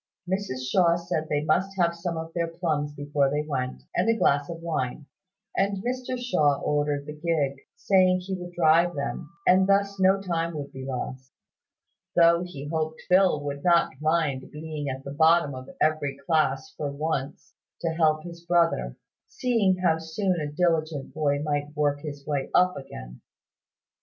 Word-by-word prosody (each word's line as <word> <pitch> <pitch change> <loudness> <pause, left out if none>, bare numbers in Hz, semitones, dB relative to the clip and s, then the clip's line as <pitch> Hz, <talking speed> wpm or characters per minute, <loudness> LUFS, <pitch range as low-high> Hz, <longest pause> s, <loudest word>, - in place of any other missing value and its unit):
Mrs 180 -10 -2
Shaw 170 -3 +4
said 170 -2 -3
they 145 0 0
must 190 +5 +1
have 170 -2 +3
some 170 0 -3
of 160 0 -5
her 170 -1 0
plums 160 -3 -2
before 145 -1 +1
they 150 +2 -1
went, 130 -4 -3
and - - +2
a 230 - +3
glass 145 -7 +2
of 165 -1 -6
wine; 155 -4 -3 0.5
and 195 0 0
Mr 255 +1 -2
Shaw 150 - +2
ordered 145 -1 0
the 150 - -6
gig, 150 -4 -1 0.2
saying 185 -2 +3
he 190 +1 -5
would 180 -1 -6
drive 170 +1 +4
them, 145 +2 -4 0.2
and 190 +1 +5
thus 200 0 +2
no 190 +1 +4
time 170 -3 -2
would 145 -2 -5
be 130 0 -8
lost, 130 0 -5 0.8
though 170 0 +5
he 175 -6 -7
hoped 160 0 -2
Phil 180 -5 +4
would 140 0 -5
not 175 -1 +4
mind 155 -4 0
being 150 -2 -5
at 130 0 -5
the 140 - -6
bottom 160 -1 +4
of 130 0 -8
every 150 -3 +1
class 135 -4 +1
for 145 - -3
once 140 -1 -4 0.3
to 170 - 0
help 155 -1 +2
his 170 -1 -10
brother, 165 - +1 0.3
seeing 225 -7 +1
how 160 -2 +3
soon 170 +2 -1
a 145 -1 -3
diligent 155 -4 0
boy 145 -1 0
might 145 0 -2
work 145 -1 +1
his 145 -2 -7
way 145 -3 -2
up 180 0 +4
again. - - -9
160 Hz, 170 wpm, -26 LUFS, 145-175 Hz, 0.8 s, and